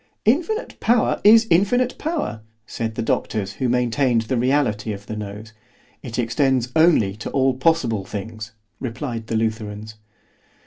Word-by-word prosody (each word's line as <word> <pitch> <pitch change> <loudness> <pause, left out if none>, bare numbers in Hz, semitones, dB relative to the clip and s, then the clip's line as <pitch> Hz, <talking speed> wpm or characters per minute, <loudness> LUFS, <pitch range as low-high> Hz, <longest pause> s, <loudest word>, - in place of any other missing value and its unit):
—— - - -51
Infinite 435 +7 -5
power 235 0 +2
is 225 +2 +7
infinite 245 +9 +3
power, 300 - -3 0.2
said 110 -1 -4
the - - -2
doctors 100 -3 -1
who 130 - +1
maintained 125 0 +2
the 120 +4 -2
reality 120 -4 +1
of 100 0 -9
the 110 - -6
nose.—It 110 +3 -10
extends 125 +1 +1
only 160 - +4
to 110 - -6
all 135 -1 +2
possible 130 -7 +1
things, 110 +3 -7 0.3
replied 120 -2 -5
the 115 - -2
_Lutherans. 110 -1 -3
115 Hz, 140 wpm, -22 LUFS, 110-145 Hz, 0.3 s, is